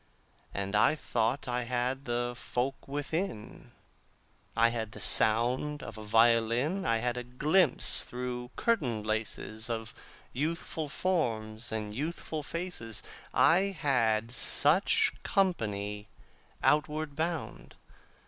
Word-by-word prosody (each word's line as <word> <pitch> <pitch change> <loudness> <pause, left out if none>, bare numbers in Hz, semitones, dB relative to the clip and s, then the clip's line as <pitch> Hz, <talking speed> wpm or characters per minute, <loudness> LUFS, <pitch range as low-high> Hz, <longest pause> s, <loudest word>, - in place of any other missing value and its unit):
And 100 0 -4
I 105 - +4
thought 120 -3 -2
I 125 0 -1
had 125 +3 -2
the 120 0 -2
folk 125 +3 -4
within: 145 - -5 0.9
I 115 +1 +5
had 110 -3 -4
the - - -10
sound 125 +7 +3
of - - -8
a 110 - -9
violin; 115 - +2
I 115 - +2
had 120 +2 -2
a 125 - -3
glimpse 150 +9 +3
through 125 0 -6
curtain 125 - -1
laces 110 +1 -3
Of 115 -1 -4 0.4
youthful 155 +2 -3
forms 115 -11 -2
and 105 -2 -4
youthful 155 +2 -4
faces. 160 - -2 0.3
I 190 +3 +3
had 115 -6 +1
such 150 +8 +5
company 105 - -1 0.5
outward 150 0 +1
bound. 165 +1 -4
125 Hz, 110 wpm, -29 LUFS, 110-150 Hz, 0.9 s, I